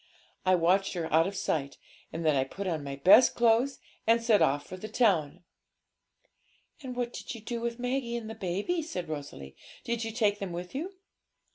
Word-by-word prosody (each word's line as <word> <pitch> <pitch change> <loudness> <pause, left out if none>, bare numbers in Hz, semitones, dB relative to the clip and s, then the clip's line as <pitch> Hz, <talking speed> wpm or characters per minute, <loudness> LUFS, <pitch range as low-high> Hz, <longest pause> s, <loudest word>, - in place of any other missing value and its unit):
I 185 - +6
watched 185 +3 +2
her 165 -4 -4
out 165 +2 +5
of 200 - -5
sight, 150 -7 -2 0.3
and 165 0 -4
then 155 -2 +4
I 135 - +3
put 195 +9 -7
on 160 -5 -2
my 140 -1 -5
best 190 - +6
clothes 235 +3 +3 0.3
and 230 +1 +5
set 230 -3 +3
off 145 +1 +2
for - - -8
the 185 +4 -7
town.' 180 - +1 1.4
'And 255 -3 -6
what 245 -1 -2
did - - -6
you - - -8
do 230 +2 -5
with 235 0 -3
Maggie 245 -1 -2
and 220 -1 -7
baby?' 200 - -1
said 185 - -5
Rosalie; 140 - -7 0.3
'did 235 -1 -2
you 225 - -3
take 210 -3 +1
them 195 -3 -4
with 175 +1 -6
you?' 345 +8 -5
200 Hz, 190 wpm, -29 LUFS, 165-235 Hz, 1.4 s, I